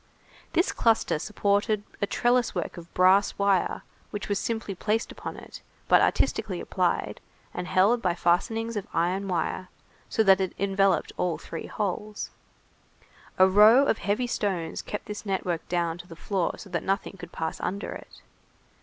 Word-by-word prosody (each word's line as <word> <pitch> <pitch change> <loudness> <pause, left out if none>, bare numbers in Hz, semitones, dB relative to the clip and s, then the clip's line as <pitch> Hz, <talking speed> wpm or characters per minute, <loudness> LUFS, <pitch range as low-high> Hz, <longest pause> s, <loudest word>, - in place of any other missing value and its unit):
This 345 +2 +2
cluster 225 -8 +2
supported 205 +2 0 0.2
a 200 - +1
trellis 240 +2 +1
work - - -3
of 170 -1 -11
brass 190 +2 +4
wire 200 -2 +1 0.3
which 205 -1 -5
was 200 -1 +1
simply 225 -3 -3
placed 215 +4 -1
upon - - -7
it, - - -11 0.3
but - - +6
artistically - - +1
applied, - - -1 0.3
and 180 0 -4
held 205 +7 +3
by 175 -5 +1
fastenings 225 +7 +1
of 205 - -3
iron 185 +4 0
wire, 180 +1 -2 0.4
so 220 - +2
that 195 -1 +5
it 190 - -2
enveloped 195 0 +2
all 180 -2 0
three 165 - -7
holes. 210 +1 -3 1.1
A 185 - +7
row 210 +6 +7
of 225 - +2
very - - -9
heavy 210 +5 +1
stones 190 -8 -2
kept 210 - -6
this 210 0 -6
network 185 -4 -2
down 170 -1 -1
to 175 - -10
the 165 - -10
floor 185 0 -2
so - - -10
that 175 - -1
nothing 195 +1 -2
could 175 -1 -10
pass 160 0 -4
under 200 +3 -3
it. - - -11
195 Hz, 165 wpm, -27 LUFS, 180-210 Hz, 1.1 s, A